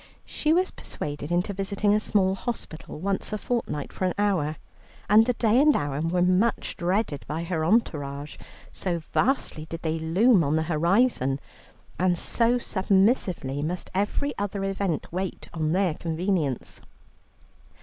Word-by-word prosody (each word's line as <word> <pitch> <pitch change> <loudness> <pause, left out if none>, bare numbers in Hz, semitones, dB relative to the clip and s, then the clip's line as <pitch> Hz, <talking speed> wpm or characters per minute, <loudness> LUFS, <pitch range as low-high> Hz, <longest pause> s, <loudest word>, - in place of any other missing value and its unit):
She 305 - -1
was 365 +3 +2
persuaded 145 +1 -5
into 180 +3 0
visiting 200 +1 0
a 210 - +3
small 195 -3 +2
hospital 195 -8 -6
once 195 +3 -1
a - - 0
fortnight 210 - -3
for 185 - -2
an 180 - 0
hour, 185 -7 +1 0.5
and 220 +3 +6
the 250 - +2
day 230 +1 +3
and 300 0 +5
hour 145 0 -1
were 175 +2 +1
much 185 +6 +1
dreaded 175 - -1
by 160 +2 -3
her 165 -2 -2
entourage, 150 -7 0 0.3
so 180 -3 -2
vastly 165 - -1
did 165 0 -6
they 160 0 -1
loom 185 +5 +4
on 145 +1 +1
the 160 - +1
horizon, 170 - +2 0.6
and 180 -1 +2
so 235 +7 +2
submissively 190 - +1
must 170 +4 -4
every 205 +9 -1
other 200 -1 -2
event 195 -4 -1
wait 185 +1 -4
on 155 -2 -1
their 185 -1 +2
convenience. 165 - -2
185 Hz, 150 wpm, -26 LUFS, 160-205 Hz, 0.6 s, and